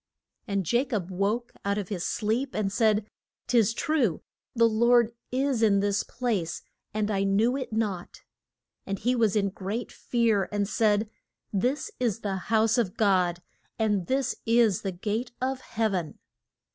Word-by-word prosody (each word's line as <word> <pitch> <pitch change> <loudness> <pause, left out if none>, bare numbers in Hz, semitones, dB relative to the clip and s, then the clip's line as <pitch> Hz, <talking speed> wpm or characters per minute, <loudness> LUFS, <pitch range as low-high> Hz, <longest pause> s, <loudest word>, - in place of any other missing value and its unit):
And 200 -3 -1
Ja 240 +2 +4
cob 205 -9 -3
woke 205 +6 -1
out 200 0 0
of 200 -3 -3
his 185 -5 -3
sleep, 230 +7 -1
and 205 -2 0
said, 215 -2 +3 0.4
'Tis 230 -3 +3
true 255 - 0 0.3
the 230 -1 +5
Lord 235 +1 +4 0.2
is 260 -2 0
in 205 -3 +4
this 200 +1 +1
place, 210 -10 -2 0.3
and 215 0 -1
I 195 -1 +1
knew 210 +6 +2
it 265 -3 -4
not. 210 -5 -3 0.6
And 195 0 -2
he 245 +6 +1
was 225 -4 +2
in 200 -2 +2
great 200 +5 -4
fear, 230 -5 +1
and 205 -1 0
said, 210 0 +2 0.5
This 250 +9 0
is 230 -3 0
the 195 -2 -2
house 225 +1 +3
of 195 -6 -1
God, 180 -4 +2 0.3
and 210 -5 +1
this 265 -1 0
is 230 -4 +4
the 195 - -2
gate 215 +7 -3
of 260 0 -2
heav 220 -3 -1
en! 175 -5 -3
215 Hz, 160 wpm, -27 LUFS, 200-235 Hz, 0.6 s, the